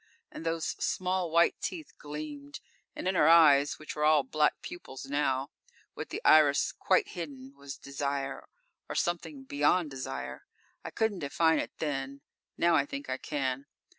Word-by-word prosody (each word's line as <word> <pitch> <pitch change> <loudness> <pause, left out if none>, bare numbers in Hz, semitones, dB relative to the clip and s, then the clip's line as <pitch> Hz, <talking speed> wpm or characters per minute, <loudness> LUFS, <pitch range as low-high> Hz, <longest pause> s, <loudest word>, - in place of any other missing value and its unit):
And - - -8
those 165 0 -1 0.2
small 185 -1 0
white 170 +1 +3
teeth 320 -4 -5
gleamed; 145 -1 -7 0.4
and - - -4
in 190 - +2
her 165 -4 +4
eyes, 145 -4 +6
which 155 - -8
were 150 - -2
all 155 -2 +5
black 150 +3 +1
pupils 135 -6 -8
now, 135 -1 0 0.4
with - - -7
the - - -5
iris 150 -2 +5
quite 185 - +1
hidden, 140 -6 -7
was 140 -1 -9
desire 140 0 -4 0.4
or - - -4
something 160 -5 -2
beyond 145 +4 +1
desire. 130 - -6 0.4
I - - -5
couldn't 220 -4 -1
define 160 +2 +2
it - - -5
then; 140 -2 -3 0.4
now, 170 0 +3
I 165 - +3
think 280 0 -6
I - - -1
can. 135 -2 -3
150 Hz, 160 wpm, -30 LUFS, 140-165 Hz, 0.4 s, eyes